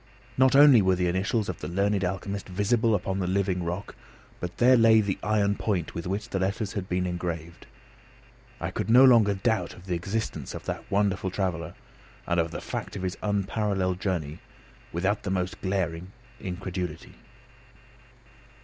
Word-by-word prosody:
Not 130 Hz, +1 st, +4 dB
only 140 Hz, -5 st, +8 dB
were 95 Hz, -1 st, +3 dB
the 90 Hz, 0 st, 0 dB
initials 100 Hz, +5 st, 0 dB
of 95 Hz, -, -4 dB
the -, -, -5 dB
learned 100 Hz, +2 st, 0 dB
alchemist 95 Hz, +2 st, -3 dB
visible 110 Hz, +4 st, +2 dB
upon 95 Hz, 0 st, -2 dB
the 90 Hz, -, -1 dB
living 95 Hz, -1 st, 0 dB
rock, 90 Hz, +4 st, -5 dB, 0.4 s
but 90 Hz, +1 st, -6 dB
there 125 Hz, +1 st, +6 dB
lay 115 Hz, -2 st, +6 dB
the 100 Hz, -3 st, -1 dB
iron 105 Hz, -1 st, +2 dB
point 100 Hz, -5 st, -2 dB
with 85 Hz, +1 st, -5 dB
which 100 Hz, +3 st, -3 dB
the 95 Hz, -, -2 dB
letters 100 Hz, +2 st, -2 dB
had 100 Hz, -2 st, -4 dB
been 90 Hz, 0 st, 0 dB
engraved. 85 Hz, -2 st, -5 dB, 0.9 s
I -, -, -3 dB
could -, -, -3 dB
no 125 Hz, +3 st, +8 dB
longer 115 Hz, -6 st, +5 dB
doubt 95 Hz, -2 st, -1 dB
of 90 Hz, -, -14 dB
the 90 Hz, -, -2 dB
existence 95 Hz, +6 st, -3 dB
of -, -, -8 dB
that -, -, -5 dB
wonderful 100 Hz, -1 st, +1 dB
traveller 85 Hz, -3 st, -3 dB, 0.5 s
and 85 Hz, -1 st, +1 dB
of 85 Hz, 0 st, +1 dB
the -, -, -6 dB
fact -, -, -5 dB
of 95 Hz, -, -5 dB
his 90 Hz, -1 st, -2 dB
unparalleled 100 Hz, -2 st, -1 dB
journey, 85 Hz, -7 st, -2 dB, 0.5 s
without 95 Hz, +5 st, 0 dB
the -, -, -4 dB
most 95 Hz, -1 st, -2 dB
glaring 95 Hz, -2 st, -2 dB, 0.3 s
incredulity. 90 Hz, -3 st, -5 dB
95 Hz, 165 wpm, -27 LUFS, 90-105 Hz, 0.9 s, only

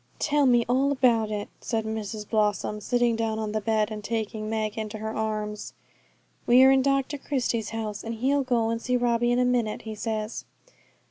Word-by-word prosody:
'Tell 295 Hz, -2 st, +2 dB
me 240 Hz, -2 st, +4 dB
all 265 Hz, +3 st, +2 dB
about 240 Hz, -5 st, +3 dB
it,' 210 Hz, -1 st, -4 dB
said 225 Hz, -2 st, -2 dB
Mrs 215 Hz, -1 st, -4 dB
Blossom, 210 Hz, -1 st, 0 dB
sitting 240 Hz, +2 st, +1 dB
down 225 Hz, -1 st, -1 dB
on 215 Hz, -1 st, -3 dB
the 215 Hz, 0 st, -1 dB
bed 215 Hz, 0 st, +1 dB
and 210 Hz, -1 st, -6 dB
taking 215 Hz, -1 st, -3 dB
Meg 215 Hz, -1 st, -2 dB
into 215 Hz, -1 st, -4 dB
her 220 Hz, +1 st, -4 dB
arms. 215 Hz, -1 st, -3 dB, 0.7 s
'We're 255 Hz, +2 st, +7 dB
in 270 Hz, 0 st, +4 dB
Dr 275 Hz, +1 st, 0 dB
Christie's 245 Hz, -6 st, -1 dB
house, 215 Hz, -2 st, -4 dB
and 230 Hz, 0 st, -4 dB
he'll 270 Hz, +5 st, +1 dB
go 235 Hz, -4 st, +1 dB
and 230 Hz, 0 st, -2 dB
see 250 Hz, +1 st, +1 dB
Robbie 240 Hz, 0 st, +1 dB
in 245 Hz, -, +2 dB
a 250 Hz, -, +3 dB
minute, 240 Hz, -4 st, 0 dB
he 220 Hz, 0 st, -6 dB
says.' 215 Hz, 0 st, -3 dB
225 Hz, 190 wpm, -26 LUFS, 215-245 Hz, 0.7 s, We're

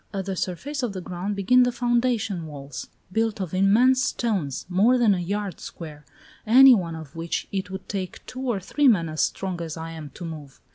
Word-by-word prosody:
At 195 Hz, -2 st, -4 dB
the 195 Hz, -1 st, -3 dB
surface 270 Hz, -, -3 dB
of 240 Hz, -5 st, -2 dB
the 185 Hz, -, -5 dB
ground 185 Hz, +3 st, -4 dB
begin 225 Hz, +6 st, +4 dB
the 245 Hz, 0 st, +3 dB
foundation 235 Hz, -7 st, 0 dB
walls, 140 Hz, -2 st, -8 dB, 0.2 s
built 225 Hz, +1 st, 0 dB
of 185 Hz, -4 st, -4 dB
immense 225 Hz, +8 st, +4 dB
stones, 200 Hz, -, -1 dB
more 205 Hz, +8 st, +4 dB
than 230 Hz, -4 st, +4 dB
a 185 Hz, -, -1 dB
yard 200 Hz, 0 st, -3 dB
square, 150 Hz, -3 st, -9 dB, 0.4 s
any 260 Hz, +4 st, +8 dB
one 170 Hz, -7 st, 0 dB
of 160 Hz, -2 st, -10 dB
which 165 Hz, 0 st, -3 dB
it 190 Hz, -1 st, -3 dB
would 190 Hz, 0 st, -7 dB
take 190 Hz, -2 st, -5 dB
two 255 Hz, -, -7 dB
or 240 Hz, -6 st, -1 dB
three 285 Hz, +10 st, +1 dB
men 185 Hz, -9 st, +4 dB
as 155 Hz, 0 st, -2 dB
strong 185 Hz, -3 st, -2 dB
as 165 Hz, -1 st, -5 dB
I 165 Hz, 0 st, -6 dB
am 160 Hz, -3 st, -8 dB
to 175 Hz, -, -7 dB
move. 150 Hz, -4 st, -9 dB
195 Hz, 205 wpm, -24 LUFS, 165-235 Hz, 0.4 s, any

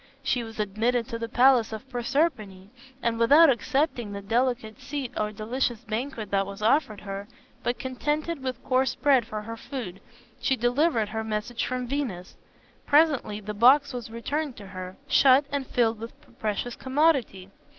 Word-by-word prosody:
She 250 Hz, -2 st, 0 dB
was 225 Hz, -1 st, -10 dB
admitted 225 Hz, +4 st, 0 dB
to 230 Hz, -, -4 dB
the 230 Hz, 0 st, -4 dB
palace 245 Hz, -2 st, +4 dB
of 220 Hz, +4 st, -7 dB
Proserpine, 240 Hz, -, -1 dB, 0.3 s
and 230 Hz, -1 st, 0 dB
without 285 Hz, +6 st, +7 dB
accepting 250 Hz, -2 st, -1 dB
the 200 Hz, -, -5 dB
delicate 230 Hz, 0 st, -1 dB
seat 280 Hz, -4 st, -5 dB
or 210 Hz, 0 st, -1 dB
delicious 230 Hz, +2 st, -2 dB
banquet 230 Hz, -2 st, -4 dB
that 195 Hz, -1 st, +1 dB
was 200 Hz, +1 st, -8 dB
offered 220 Hz, -3 st, +2 dB
her, 200 Hz, 0 st, -6 dB, 0.3 s
but 240 Hz, -, -1 dB
contented 295 Hz, +4 st, -2 dB
with 255 Hz, -1 st, -4 dB
coarse 260 Hz, +1 st, +1 dB
bread 265 Hz, -6 st, +3 dB
for 215 Hz, 0 st, -5 dB
her 230 Hz, +1 st, -6 dB
food, 230 Hz, -7 st, -7 dB, 0.4 s
she 265 Hz, -, +1 dB
delivered 240 Hz, -1 st, +1 dB
her 220 Hz, 0 st, -3 dB
message 220 Hz, +2 st, -3 dB
from 255 Hz, 0 st, -2 dB
Venus. 240 Hz, -9 st, -4 dB, 0.5 s
Presently 290 Hz, -8 st, +3 dB
the 210 Hz, +1 st, -5 dB
box 260 Hz, +7 st, +5 dB
was 240 Hz, -3 st, -6 dB
returned 275 Hz, +5 st, -3 dB
to 205 Hz, -, -10 dB
her, 185 Hz, -1 st, -8 dB
shut 270 Hz, +1 st, +5 dB
and 280 Hz, -2 st, -2 dB
filled 225 Hz, -2 st, +1 dB
with 230 Hz, +1 st, -9 dB
the -, -, -22 dB
precious 235 Hz, -1 st, -3 dB
commodity. 260 Hz, -, +1 dB
240 Hz, 165 wpm, -26 LUFS, 215-270 Hz, 0.5 s, without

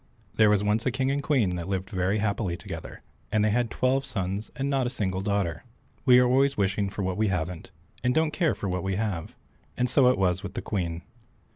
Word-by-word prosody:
There 110 Hz, -1 st, +5 dB
was 105 Hz, -1 st, +3 dB
once 105 Hz, +2 st, +1 dB
a -, -, +4 dB
King 130 Hz, +1 st, 0 dB
and 140 Hz, +1 st, 0 dB
Queen 120 Hz, -12 st, +1 dB
that 85 Hz, -, -5 dB
lived 95 Hz, +1 st, -3 dB
very 95 Hz, +1 st, +1 dB
happily 100 Hz, -4 st, -1 dB
together, -, -, -8 dB, 0.3 s
and 110 Hz, -1 st, +2 dB
they 110 Hz, -, +2 dB
had 120 Hz, +1 st, +1 dB
twelve 130 Hz, +3 st, +1 dB
sons 100 Hz, -5 st, -3 dB
and 135 Hz, +1 st, -2 dB
not 135 Hz, -3 st, +1 dB
a -, -, -1 dB
single 95 Hz, -6 st, -2 dB
daughter. 100 Hz, -5 st, -1 dB, 0.4 s
We 125 Hz, -2 st, +7 dB
are 125 Hz, -, +6 dB
always 135 Hz, +3 st, +3 dB
wishing 100 Hz, 0 st, +1 dB
for 100 Hz, 0 st, -4 dB
what 95 Hz, -1 st, -2 dB
we 110 Hz, 0 st, +2 dB
haven't, 90 Hz, -2 st, -3 dB, 0.3 s
and 125 Hz, -, +3 dB
don't 160 Hz, -1 st, +2 dB
care 165 Hz, -2 st, +1 dB
for 100 Hz, -, -4 dB
what 90 Hz, -1 st, -1 dB
we 95 Hz, +1 st, -1 dB
have, 100 Hz, -6 st, -3 dB, 0.4 s
and 125 Hz, -, +2 dB
so 125 Hz, 0 st, +5 dB
it 125 Hz, -, +2 dB
was 90 Hz, -1 st, +1 dB
with 100 Hz, -1 st, -7 dB
the -, -, -2 dB
Queen. 85 Hz, -4 st, -3 dB
105 Hz, 230 wpm, -27 LUFS, 95-125 Hz, 0.4 s, We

